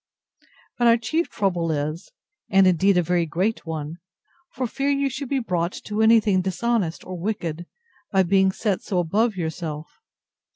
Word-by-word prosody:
But 240 Hz, -, +4 dB
our 230 Hz, 0 st, +6 dB
chief 315 Hz, +9 st, -1 dB
trouble 175 Hz, -5 st, -1 dB
is, 155 Hz, +3 st, -3 dB, 0.4 s
and 195 Hz, -1 st, +5 dB
indeed 185 Hz, +1 st, +4 dB
a 180 Hz, -, +3 dB
very 170 Hz, 0 st, +1 dB
great 185 Hz, +5 st, -1 dB
one, 160 Hz, 0 st, -5 dB, 0.5 s
for 255 Hz, -, -3 dB
fear 275 Hz, +4 st, -2 dB
you 280 Hz, -1 st, +1 dB
should 270 Hz, 0 st, -5 dB
be 275 Hz, -, +1 dB
brought 180 Hz, -7 st, -1 dB
to 210 Hz, +1 st, -2 dB
anything 220 Hz, -4 st, +4 dB
dishonest 190 Hz, -1 st, -1 dB
or 185 Hz, -1 st, -6 dB
wicked, 175 Hz, -4 st, -3 dB, 0.4 s
by 190 Hz, -1 st, +4 dB
being 190 Hz, +1 st, +3 dB
set 200 Hz, -1 st, -1 dB
so 190 Hz, -, -3 dB
above 205 Hz, +6 st, +1 dB
yourself. 160 Hz, -3 st, -5 dB
190 Hz, 160 wpm, -23 LUFS, 170-225 Hz, 0.5 s, our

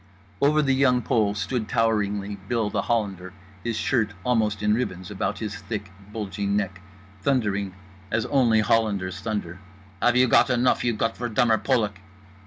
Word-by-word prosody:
Over 150 Hz, +2 st, +4 dB
The 135 Hz, -2 st, +2 dB
Young 130 Hz, -2 st, +3 dB
Pole 105 Hz, -3 st, +1 dB
stood 110 Hz, +2 st, -2 dB
toweringly 105 Hz, -3 st, 0 dB
Bill 115 Hz, -4 st, 0 dB
The -, -, 0 dB
Hollander, 100 Hz, -6 st, -2 dB, 0.3 s
his 115 Hz, -2 st, -2 dB
shirt 110 Hz, -5 st, 0 dB
almost 110 Hz, -4 st, +1 dB
in 105 Hz, 0 st, +3 dB
ribbons 95 Hz, -6 st, -3 dB
about 100 Hz, -, -2 dB
his 110 Hz, -1 st, -4 dB
thick 100 Hz, -2 st, -6 dB, 0.2 s
bulging 100 Hz, -1 st, -2 dB
neck, 95 Hz, -3 st, -3 dB, 0.4 s
thundering 100 Hz, -6 st, 0 dB, 0.3 s
as 110 Hz, +1 st, 0 dB
only 120 Hz, -6 st, +3 dB
Hollanders 100 Hz, -5 st, +1 dB
thunder: 100 Hz, -5 st, -4 dB, 0.4 s
"Have 120 Hz, 0 st, +4 dB
you 130 Hz, 0 st, +5 dB
got 125 Hz, -, +5 dB
enough 125 Hz, 0 st, +2 dB
you 120 Hz, -2 st, +1 dB
Gottverdummer 115 Hz, -1 st, +1 dB
Polak?" 105 Hz, -7 st, +1 dB
110 Hz, 150 wpm, -25 LUFS, 100-120 Hz, 0.4 s, you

